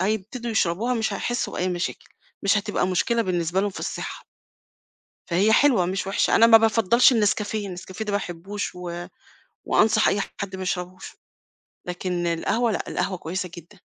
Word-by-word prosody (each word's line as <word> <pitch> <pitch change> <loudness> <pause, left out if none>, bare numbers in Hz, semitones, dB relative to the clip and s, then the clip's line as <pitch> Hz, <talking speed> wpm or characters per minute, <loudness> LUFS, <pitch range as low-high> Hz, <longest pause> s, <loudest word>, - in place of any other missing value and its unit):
هيبتدوا 220 +5 -2
يشربوها 220 +4 +1
مش 220 -3 -1
هيحسّوا 240 +4 -2
بأي 185 - -1
مشاكل، 175 -1 -3 0.4
مش 200 +1 +3
هتبقى 205 -2 -1
مشكلة 230 +6 +1
بالنسبة 175 -1 0
لهم 205 0 0
في - - -8
الصحّة. - - -5 1.0
فهي 195 +6 +3
حلوة 240 -9 +4
مش 190 +1 -2
وِحشة، 195 - +2
أنا 230 - +7
ما 225 -1 +9
بافضّلش 225 +3 +4
النسكافيه، 210 -2 0
النسكافسه 185 +3 -7
ده 210 - -3
ما 200 - +2
باحبّوش 190 +2 -5
و 175 -1 -6 0.6
وأنصح 215 0 +3
أي 200 - +1 0.2
حد 195 -2 -4
ما 190 - -6
يشربوش، 180 0 -5 0.7
لكن 180 -1 -2
القهوة 220 +8 0
لأ، - - -3
القهوة 190 -1 -2
كويسة 180 +1 -4
جدًا. 175 +4 -13
195 Hz, 160 wpm, -24 LUFS, 180-220 Hz, 1.0 s, ما